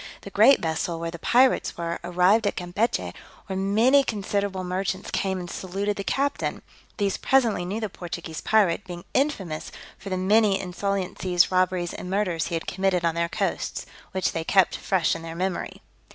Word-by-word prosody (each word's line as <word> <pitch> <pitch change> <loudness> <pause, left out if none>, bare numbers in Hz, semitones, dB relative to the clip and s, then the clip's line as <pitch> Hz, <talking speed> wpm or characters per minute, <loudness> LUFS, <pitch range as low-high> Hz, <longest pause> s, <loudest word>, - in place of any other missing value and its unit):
The - - -10
great 275 - +6
vessel, 165 +1 -2
where 165 0 -3
the 170 - -8
pirates 255 +8 +3
were, 170 0 -3
arrived 180 +5 +3
at - - -1
Campechy, 180 +6 -1 0.3
where 190 - -5
many 220 +9 +4
considerable 200 -4 -2
merchants 185 +1 -3
came 190 -1 -1
and 175 - -6
saluted 195 +4 -3
the 200 - -4
captain; 280 +7 -1 0.3
these 200 -3 0
presently 235 -9 +2
knew 200 +5 -3
the 220 - -2
Portuguese 170 -3 -7
pirate, 205 -4 +2
being 175 0 -8
infamous 195 - -1 0.3
for 200 - -8
the 185 - -1
many 200 +1 +3
insolencies, 185 -1 0
robberies 185 -1 +1
and 180 - -7
murders 185 -5 0
he 170 - -3
had 165 - -3
committed 190 -2 0
on 165 - +2
their 170 0 -1
coasts, - - -2 0.3
which 190 -1 0
they 165 - -3
kept 190 +2 +3
fresh 180 -5 +1
in 165 - -6
their 165 0 -7
memory. 185 +1 -3
190 Hz, 175 wpm, -25 LUFS, 175-205 Hz, 0.3 s, great